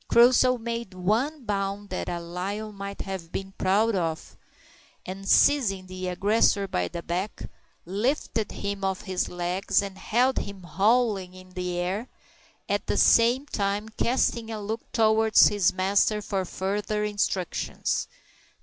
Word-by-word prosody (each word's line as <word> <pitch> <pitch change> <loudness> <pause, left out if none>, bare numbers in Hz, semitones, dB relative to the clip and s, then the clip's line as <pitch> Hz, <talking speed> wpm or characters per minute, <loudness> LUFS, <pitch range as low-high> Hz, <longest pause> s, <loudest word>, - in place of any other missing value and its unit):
Crusoe 250 +1 +5
made 230 -4 -5
one 235 +11 0
bound 200 0 -2
that 185 - -3
a 175 -1 -3
lion 195 +5 -5
might 200 0 -6
have 190 -4 -6
been 195 0 -5
proud 210 +4 +3
of, 165 -4 -3 0.7
and 195 +2 -6
seizing 205 -10 +4
the 185 0 -6
aggressor 200 +2 +2
by 90 - -1
the 170 - -6
back, 180 +4 -3 0.4
lifted 215 - -1
him 200 -1 -4
off 190 -1 -1
his 190 -3 -2
legs 180 +2 0
and 195 -2 -4
held 250 +4 +2
him, 200 -2 -7
howling, 195 +1 +1
in 185 0 -14
the 180 -1 -3
air 190 +7 -2 0.6
at - - -1
the - - 0
same 240 +4 +5
time 205 -4 -2
casting 235 0 0
a 220 -1 -4
look 220 +2 -4
towards 220 -1 +5
his 200 -3 +2
master 195 +3 +2
for 195 -2 -2
further 205 +3 -2
instructions. 205 -4 -1
200 Hz, 140 wpm, -26 LUFS, 185-220 Hz, 0.7 s, Crusoe